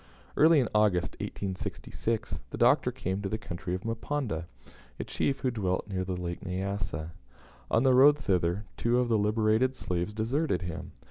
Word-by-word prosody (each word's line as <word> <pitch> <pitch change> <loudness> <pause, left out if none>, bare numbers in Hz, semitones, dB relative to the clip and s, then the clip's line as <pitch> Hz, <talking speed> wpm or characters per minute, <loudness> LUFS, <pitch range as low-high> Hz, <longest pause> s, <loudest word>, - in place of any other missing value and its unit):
Early 160 0 +6
in 125 - +2
August, 105 -5 +3
1866, 105 +3 -3
the - - -6
Doctor - - +4
came 95 +2 -3
to 100 - -3
the 110 - -1
country 90 -2 -4
of 90 - -5
Mponda, 115 - -2 0.5
a - - -1
chief 135 -1 -1
who 130 - +1
dwelt 95 -6 -1
near 95 -3 -2
the 90 -1 -3
Lake 85 -1 -4
Nyassa. 95 -4 -3 0.6
On 115 - +3
the 130 -1 +5
road 140 +3 +7
thither, 95 -5 0
two 120 +1 +2
of 125 -1 +1
the 115 - +3
liberated 110 +4 +2
slaves 90 -1 -2
deserted 110 - 0
him. 85 -2 -6
105 Hz, 170 wpm, -29 LUFS, 90-120 Hz, 0.6 s, road